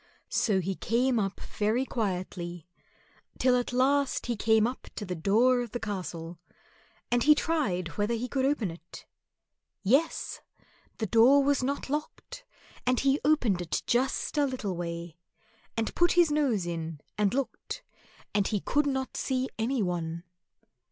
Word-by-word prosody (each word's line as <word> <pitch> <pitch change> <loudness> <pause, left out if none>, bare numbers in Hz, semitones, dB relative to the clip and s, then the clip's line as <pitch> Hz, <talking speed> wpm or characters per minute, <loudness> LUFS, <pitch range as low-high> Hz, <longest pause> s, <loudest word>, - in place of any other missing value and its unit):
So 195 -4 +2
he 190 +2 -2
came 240 +5 +1
up 195 -2 -2
very 220 +5 -1
quietly, 180 - -3 0.7
till 255 -1 +4
at 245 0 0
last 275 +3 +2
he 240 - -1
came 220 0 +3
up 250 +2 -4
to 210 - -4
the 180 - -3
door 225 +9 +3
of 240 -3 -6
the 240 - -2
castle, 175 -5 -5 0.7
and 245 0 +3
he 300 +4 +6
tried 265 - 0
whether 210 +3 +1
he 235 +2 -3
could 265 0 -1
open 265 - +1
it. 165 +1 -12 0.8
Yes! 275 +11 +1 0.6
the 220 - -1
door 240 +7 +6
was 280 -1 +2
not 275 +3 -2
locked, 305 - -5 0.4
and 250 0 +2
he 275 +1 +2
opened 250 -12 +2
it 175 - -2
just 260 +4 0
a 285 - +3
little 225 -8 -3
way, 170 -1 -5 0.6
and 225 -1 -1
put 345 0 +3
his 345 -3 +4
nose 265 -11 +1
in 165 -3 -4
and 210 +1 +1
looked, 275 - -4 0.5
and 205 -1 +2
he 210 - 0
could 290 +8 +1
not 265 -1 -2
see 260 -1 -1
any 235 +1 +1
one. 170 -2 -3
235 Hz, 155 wpm, -29 LUFS, 185-270 Hz, 0.8 s, he